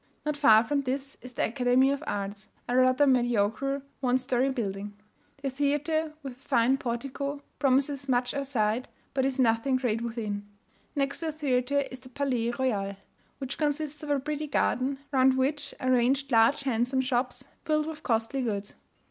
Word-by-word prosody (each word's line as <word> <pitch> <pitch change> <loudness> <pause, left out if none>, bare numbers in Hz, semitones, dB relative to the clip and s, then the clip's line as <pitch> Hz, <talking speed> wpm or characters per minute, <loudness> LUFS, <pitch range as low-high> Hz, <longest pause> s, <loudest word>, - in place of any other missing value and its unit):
Not 300 -1 0
far 225 -7 +6
from 280 +4 0
this 275 +1 -3
is 250 0 -9
the - - +1
Academy 250 +2 +3
of 280 +2 -2
Arts, 200 +1 -4 0.2
a 245 - 0
rather 255 +2 +5
mediocre 245 +1 +1 0.2
one 255 -1 +2
story 255 0 +1
building. 205 -5 -3 0.5
The 275 - -1
Theatre, 295 +3 0
with 270 -2 -5
a 250 - -23
fine 265 -1 +2
portico, 275 +4 -3 0.2
promises 275 0 +1
much 245 -1 +1
outside, 255 -4 0 0.3
but 265 -1 +1
is 270 -1 -1
nothing 235 +2 +3
great 240 -3 0
within. 215 -3 -4 0.5
Next 275 -1 -1
to 330 - -3
the - - 0
theatre 280 -2 +1
is 255 - -8
the 255 0 -14
Palais 250 -3 -1
Royal, 215 -6 -1 0.4
which 270 -1 -5
consists 300 -1 -1
of 300 - -7
a 285 -1 +2
pretty 300 +2 -3
garden, 270 -1 +1
round 260 -1 +4
which 280 +3 0
are 255 - +1
ranged 265 +3 +2
large 230 +5 +4
handsome 255 0 +1
shops, 250 0 -1 0.2
filled 305 -1 +1
with 315 -1 -6
costly 230 +3 0
goods. 205 -4 -3
260 Hz, 170 wpm, -28 LUFS, 240-280 Hz, 0.5 s, far